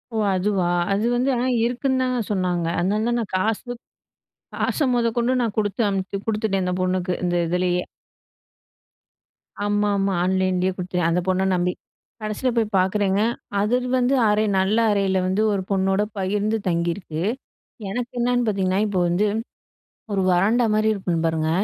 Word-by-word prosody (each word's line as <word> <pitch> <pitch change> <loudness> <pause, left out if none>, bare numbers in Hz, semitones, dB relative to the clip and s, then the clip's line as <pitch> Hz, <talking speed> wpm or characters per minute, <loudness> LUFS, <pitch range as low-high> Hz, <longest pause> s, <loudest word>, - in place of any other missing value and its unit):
ஓ! - - +1 0.2
அதுவா, 185 -1 0 0.2
அது 205 +3 +1
வந்து 255 +3 +1
ஆனா 245 +2 0 0.2
இருக்குன்னு 260 +2 0
தாங்க 255 -1 0
சொன்னாங்க. 180 -4 0
அதனால 205 +5 0
தான் 240 0 +1
நான் 220 - -4
காசு 215 +3 0
த் 240 - -8 0.7
காச - - -1
மொதகொண்டு 235 +1 +1
நான் 225 -4 -1
கொடுத்து 210 +2 0
அனுப்பிச் 195 +1 -3
கொடுத்துட்டேன் 210 -3 0
அந்த 180 - -1
பொண்ணுக்கு 185 0 0
இந்த 175 0 0
இதிலேயே. 180 +1 0 1.8
ஆமாமா. 205 -1 +1
ஆன்லைன்லயே 185 0 +1
குடுத்தேன் 180 -2 -1
அந்த 170 - +1
பொண்ண 185 +1 +2
நம்பி. 180 0 0 0.5
கடைசில 215 +4 -1
போய் 220 -2 0
பாக்குறேங்க, 195 +1 +1 0.4
அது 210 +4 +2 0.2
வந்து 255 +2 +2
அறை 210 +1 +2
நல்ல 195 +4 +1
அறையில 195 -2 +1
வந்து 190 +3 +1
ஒரு 195 - -1
பொண்ணோட 195 +1 +2 0.2
பகிர்ந்து 205 +3 0
தங்கியிருக்கு. 170 -1 -2 0.7
எனக்கு 240 +4 -3
என்னன்னு 245 0 +1
பாத்தீங்கன்னா, 195 -2 +1
இப்ப 200 - -2
வந்து, 180 +5 +1 0.9
ஒரு 195 - +1
வராண்டா 215 +7 +3
மாதிரி 215 0 +2
இருக்கும் 175 -4 -2
பாருங்க, 160 -1 0
195 Hz, 145 wpm, -23 LUFS, 185-220 Hz, 1.8 s, வராண்டா